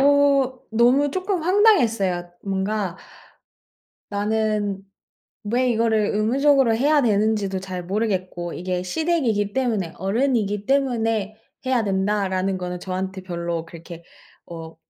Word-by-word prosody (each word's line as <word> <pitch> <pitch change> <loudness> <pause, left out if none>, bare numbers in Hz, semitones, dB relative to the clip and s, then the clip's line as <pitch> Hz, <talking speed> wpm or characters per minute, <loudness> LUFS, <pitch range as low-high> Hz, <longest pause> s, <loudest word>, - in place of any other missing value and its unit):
어 280 -2 +3
너무 245 +6 +3
쪼끔 370 +1 -2
황당했어요. 230 - +3
뭔가 195 -1 -2 1.1
나는 210 -1 -1 0.6
왜 245 +4 +1
이거를 220 -2 +2
의무적으로 260 +3 +3
해야 290 +5 +3
되는지도 210 -3 +1
잘 185 -2 -6
모르겠고 185 -3 -2
'이게 180 0 -3
시댁이기 225 - 0
때문에 220 -10 -1
어른이기 210 0 0
때문에 225 -6 0 0.3
해야 255 -3 +2
된다.'라는 195 -1 0
거는 180 -1 -5
저한테 190 +1 -4
별로 170 -2 -3
그렇게 170 0 -11 0.4
어 165 -1 -9
210 Hz, 270 characters per minute, -22 LUFS, 190-255 Hz, 1.1 s, 어